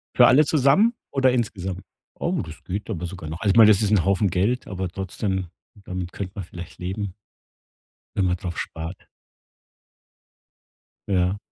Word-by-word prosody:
Für - - +8
alle 145 +5 +6
zusammen 155 - +4 0.2
oder 130 -2 +3
insgesamt? 95 -6 -2 0.3
Oh, 170 - -2
das 80 -1 -11
geht 100 +4 -4
aber 90 -4 -3
sogar 85 -3 -7
noch. 80 +2 -6
Also, 105 - +2
ich 105 - -2
meine, 110 -2 +9
das 100 - +5
ist 105 - +1
'n 105 -5 +3
Haufen 100 +1 +2
Geld, 105 +9 0
aber 95 -1 -3
trotzdem, 95 0 -3 0.4
damit 90 -1 -5
könnte 95 -2 -5
man 100 -4 -5
vielleicht 85 0 -10
leben 95 +1 -4 1.0
wenn 95 - +2
man 90 0 +1
drauf 85 -1 -6
spart. 80 +3 -6 2.0
Ja. 95 0 +1
95 Hz, 160 wpm, -24 LUFS, 90-110 Hz, 2.0 s, meine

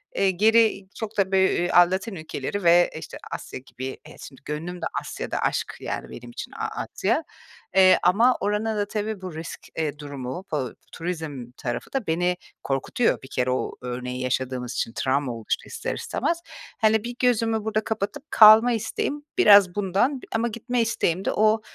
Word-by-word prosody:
eee, 195 -1 +3
geri 220 +2 +4
çok 220 -1 -6
da 195 -1 +2
bö 190 - +3
eee, 180 -2 +2
a - - +6
Latin 190 +3 -2
ülkeleri 160 +3 -4
ve, 175 +1 +6
işte, - - -9
Asya - - -6
gibi 130 0 -8 0.2
e, - - -13
şimdi 135 - -12
gönlüm 170 +4 -5
de - - -2 0.2
Asya'da. - - -4
Aşk, - - -1
yani, - - -5
benim 120 0 -10
için - - -7
A - - -4 0.2
Asya. - - -1 0.5
Eee, 190 -1 +7
ama 225 +8 +4
oranın 210 +2 -1
da 205 -1 0
tabii 215 -1 -3
bu 185 -4 -7
risk, 160 +1 -6 0.2
eee, 155 -2 -2
durumu, 145 +4 -6
bu 135 -6 -2 0.2
turizm 160 -8 -5
tarafı 120 -4 -5
da 270 -5 -2
beni 175 +2 +1 0.3
korkutuyor 135 - 0
bir - - -9
kere 125 -2 0
o 130 - -1
örneği 125 0 -4
yaşadığımız 130 -1 -2
için 115 - -2
travma 135 0 0
oluştu 115 -2 -3
ister - - -4
istemez. 335 - -2 0.4
Hani, 220 -1 +4
bir, 240 +1 -5
gözümü 225 -3 +2
burada 215 0 -1
kapatıp 220 +7 -3
kalma 220 +2 +8
isteğim 230 +6 -2
biraz 200 -4 +7
bundan, 205 +7 +1
b - - -11
ama 230 +1 +1
gitme 235 +2 -2
isteğim 195 -5 0
de - - +1
o 215 +1 +3
190 Hz, 175 wpm, -24 LUFS, 145-220 Hz, 0.5 s, kalma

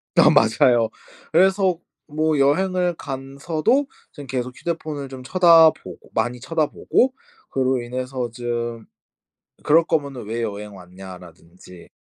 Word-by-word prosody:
다 - - +6
맞아요. 115 +1 +3 0.4
그래서 190 0 +3 0.3
뭐 155 0 0
여행을 180 +4 +1
간 135 0 -8
서도 175 - +1 0.2
좀 145 -3 -10
계속 125 0 -4
휴대폰을 155 -5 -5
좀 130 -1 -9
쳐다보고 165 0 +4
많이 120 +2 -1
쳐다보고 165 - 0 0.4
그로 130 -1 0
인해서 125 0 -4
좀 120 -1 -4 0.8
"그럴 165 +2 +4
거면은 140 -9 -2
왜 115 +2 -3
여행 105 -1 -5
왔냐?"라든지 90 -1 -13
130 Hz, 255 characters per minute, -21 LUFS, 115-160 Hz, 0.8 s, 다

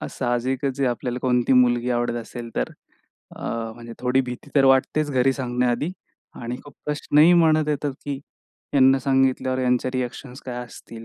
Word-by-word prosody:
अ, - - -4
साहजिकच 130 +2 -1
जे 140 -2 +1
आपल्याला 125 +1 -2
कोणती 125 0 +2
मुलगी 125 -1 +3
आवडत 120 -1 0
असेल 120 0 -7
तर - - -1 0.7
अ, - - -8 0.3
म्हणजे 120 -1 -10
थोडी 125 +1 +2
भीती 125 0 -8
तर 135 - +6
वाटतेच 135 +3 +3
घरी 130 0 +3
सांगण्याआधी. 125 +2 -1 0.4
आणि 120 +1 -5
खूप 145 -1 -13
प्रश्नही 150 +2 +4
मनात 155 -3 +4
येतात 145 -1 -1
की 145 -1 -3 0.6
ह्यांना 135 -1 +5
सांगितल्यावर 130 -1 +1
यांचे 125 0 +1
रिएक्शन्स 125 +1 -5
काय 125 -1 -4
असतील? 115 -1 -12
130 Hz, 160 wpm, -23 LUFS, 120-135 Hz, 0.7 s, तर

